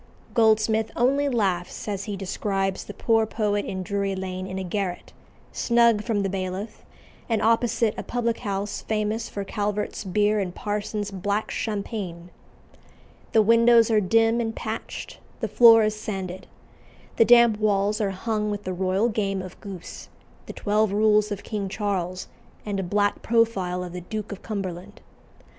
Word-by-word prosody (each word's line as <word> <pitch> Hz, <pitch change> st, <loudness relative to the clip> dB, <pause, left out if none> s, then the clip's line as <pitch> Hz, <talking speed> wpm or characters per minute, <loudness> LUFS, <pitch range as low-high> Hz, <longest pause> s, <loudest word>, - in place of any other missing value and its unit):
Goldsmith 220 Hz, -1 st, +3 dB
only 275 Hz, +4 st, +2 dB
laughs 190 Hz, -9 st, -1 dB
as 200 Hz, -2 st, -3 dB
he 205 Hz, -2 st, -4 dB
describes 195 Hz, 0 st, -2 dB
the 205 Hz, -, -8 dB
poor 225 Hz, -1 st, +2 dB
poet 210 Hz, -2 st, -1 dB
in 185 Hz, -1 st, -4 dB
Drury 200 Hz, 0 st, -1 dB
Lane 185 Hz, 0 st, -4 dB
in 190 Hz, 0 st, -5 dB
a 190 Hz, -, -3 dB
garret, 185 Hz, -1 st, -4 dB, 0.4 s
snug 235 Hz, -3 st, +3 dB
from 215 Hz, -4 st, 0 dB
the -, -, 0 dB
Bailiff, 190 Hz, +3 st, -4 dB, 0.5 s
and 225 Hz, -2 st, +2 dB
opposite 230 Hz, -1 st, +2 dB
a -, -, -1 dB
public 235 Hz, -1 st, -2 dB
house 200 Hz, -1 st, -3 dB
famous 220 Hz, +1 st, -2 dB
for 200 Hz, -, -4 dB
Calvert's 210 Hz, +1 st, -3 dB
beer 210 Hz, +2 st, +1 dB
and 180 Hz, -3 st, -3 dB
Parsons's 205 Hz, 0 st, -3 dB
"black 200 Hz, +3 st, -2 dB
champagne." 200 Hz, -5 st, -4 dB, 1.0 s
The 220 Hz, -, +6 dB
windows 230 Hz, +1 st, +5 dB
are 215 Hz, -1 st, +4 dB
dim 225 Hz, +4 st, +3 dB
and 225 Hz, -1 st, -3 dB
patched; 220 Hz, -1 st, -6 dB, 0.2 s
the -, -, -1 dB
floor 230 Hz, -2 st, +7 dB
is 215 Hz, 0 st, 0 dB
sanded. 190 Hz, -3 st, -5 dB, 0.7 s
The 230 Hz, -, +6 dB
damp 235 Hz, -3 st, +6 dB
walls 210 Hz, 0 st, +1 dB
are 205 Hz, -, +1 dB
hung 210 Hz, +2 st, -2 dB
with 205 Hz, 0 st, -4 dB
the 185 Hz, -, -3 dB
royal 190 Hz, +4 st, +1 dB
game 195 Hz, -4 st, -1 dB
of 185 Hz, -1 st, -11 dB
goose, 195 Hz, -4 st, -9 dB, 0.4 s
the -, -, -6 dB
twelve 210 Hz, 0 st, +1 dB
rules 210 Hz, 0 st, +3 dB
of 200 Hz, -, -4 dB
King 205 Hz, -3 st, -3 dB
Charles, 185 Hz, -3 st, -2 dB, 0.4 s
and 205 Hz, -2 st, -2 dB
a -, -, -1 dB
black 205 Hz, +3 st, 0 dB
profile 200 Hz, -6 st, +1 dB
of 175 Hz, -1 st, -7 dB
the 180 Hz, -, -5 dB
Duke 215 Hz, +4 st, -5 dB
of 200 Hz, -, -7 dB
Cumberland. 195 Hz, -2 st, -5 dB
205 Hz, 160 wpm, -25 LUFS, 195-220 Hz, 1.0 s, floor